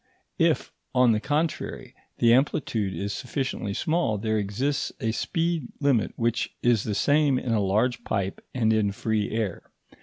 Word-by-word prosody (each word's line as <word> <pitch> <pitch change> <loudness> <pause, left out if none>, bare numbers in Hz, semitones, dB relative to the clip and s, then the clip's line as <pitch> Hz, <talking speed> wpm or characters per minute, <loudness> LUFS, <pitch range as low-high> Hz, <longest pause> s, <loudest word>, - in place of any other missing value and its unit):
If, - - +2 0.2
on 125 -2 +5
the 110 - +2
contrary, 150 +6 -2 0.2
the 115 0 +5
amplitude 120 -6 +1
is 100 +1 -3
sufficiently 125 -5 -3
small, 155 -10 +1
there 110 +1 0
exists 125 +8 -1
a 110 - 0
speed 165 +2 -1
limit 140 -6 +2
which 115 0 -1
is 120 -4 +3
the 105 - -1
same 145 0 +3
in 125 - -2
a 110 - +2
large 110 +6 +1
pipe 100 -3 -2
and 110 -3 +2
in 105 -2 +1
free 110 0 -1
air. 110 -5 -2
115 Hz, 155 wpm, -26 LUFS, 105-135 Hz, 0.2 s, on